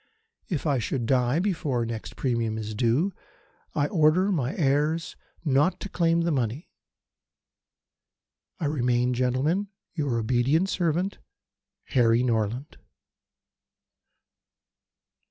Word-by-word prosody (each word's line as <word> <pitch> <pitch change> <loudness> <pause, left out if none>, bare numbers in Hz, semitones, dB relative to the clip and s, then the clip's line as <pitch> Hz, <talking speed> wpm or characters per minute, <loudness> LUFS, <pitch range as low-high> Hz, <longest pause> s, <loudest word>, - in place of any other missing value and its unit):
If 165 -5 -2
I 140 -4 +2
should 120 +1 -2
die 125 +2 +2
before 160 -9 0
the 115 0 -2
next 110 -1 -6
premium 115 -4 -1
is 110 -1 -4
due 125 - +1 0.6
I 145 - +2
order 165 +5 +3
my 140 -8 -1
heirs 150 +2 +1 0.3
not 145 +5 +2
to 200 - -6
claim 170 -2 +2
the 170 0 +1
money. 130 - -2 1.9
I 165 - -2
remain, 125 -3 +1
Gentlemen, 130 +11 +1 0.3
your 145 -8 -1
obedient 130 - +2
servant, 175 +2 0 0.7
"HARRY 120 -1 +3
NORLAND." 120 +3 -1
135 Hz, 105 wpm, -26 LUFS, 120-165 Hz, 1.9 s, order